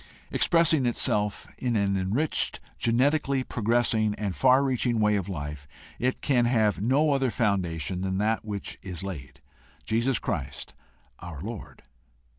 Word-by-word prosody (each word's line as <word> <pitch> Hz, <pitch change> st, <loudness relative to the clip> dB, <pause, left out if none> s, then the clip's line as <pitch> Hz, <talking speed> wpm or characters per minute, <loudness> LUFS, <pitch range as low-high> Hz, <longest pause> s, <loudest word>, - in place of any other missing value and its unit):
Expressing 165 Hz, -6 st, +3 dB
itself 105 Hz, -3 st, 0 dB
in 125 Hz, -2 st, -1 dB
an 100 Hz, -2 st, +1 dB
enriched, 105 Hz, +12 st, +1 dB, 0.2 s
genetically 135 Hz, +3 st, +2 dB
progressing, 115 Hz, -2 st, +1 dB
and 100 Hz, -4 st, -3 dB
far 130 Hz, +1 st, +4 dB
reaching 125 Hz, -3 st, 0 dB
way 105 Hz, -1 st, +3 dB
of 100 Hz, -1 st, -2 dB
life, 75 Hz, -4 st, -6 dB, 0.3 s
it 130 Hz, +1 st, -1 dB
can 125 Hz, -4 st, +2 dB
have 110 Hz, -5 st, +2 dB
no 140 Hz, +7 st, +3 dB
other 135 Hz, -2 st, +1 dB
foundation 90 Hz, -, -1 dB
than 95 Hz, 0 st, -1 dB
that 110 Hz, +3 st, 0 dB
which 105 Hz, -2 st, -5 dB
is 90 Hz, -3 st, -6 dB
laid, 75 Hz, -8 st, -8 dB, 0.4 s
Jesus 115 Hz, +3 st, +1 dB
Christ 70 Hz, -7 st, -4 dB, 0.5 s
our 85 Hz, -5 st, -8 dB
Lord. 110 Hz, +3 st, -8 dB
110 Hz, 135 wpm, -27 LUFS, 95-125 Hz, 0.5 s, far